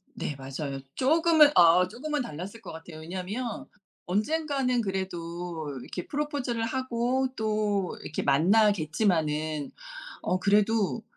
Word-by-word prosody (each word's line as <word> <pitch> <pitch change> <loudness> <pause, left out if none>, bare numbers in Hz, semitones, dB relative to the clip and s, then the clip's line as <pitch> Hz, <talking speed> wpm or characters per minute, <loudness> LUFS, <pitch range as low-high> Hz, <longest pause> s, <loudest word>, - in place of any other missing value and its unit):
네 145 - -4
맞아요. 135 +1 -5 0.2
쪼금은 315 +2 +5
아 175 +1 +6
쪼금은 295 +7 -3
달랐을 195 +3 -7
것 195 - -8
같아요. 160 0 -10
왜냐하면 190 +8 -4 0.4
언젠가는 255 - 0
그래도 175 -6 -4
이렇게 180 - -7
프러포즈를 280 -5 -2
하고 255 +1 0
또 210 -3 -1
이렇게 155 - -4
만나겠지만은 155 -3 +2 0.5
어 185 - 0
그래도 210 +2 +2
200 Hz, 285 characters per minute, -28 LUFS, 165-245 Hz, 0.5 s, 아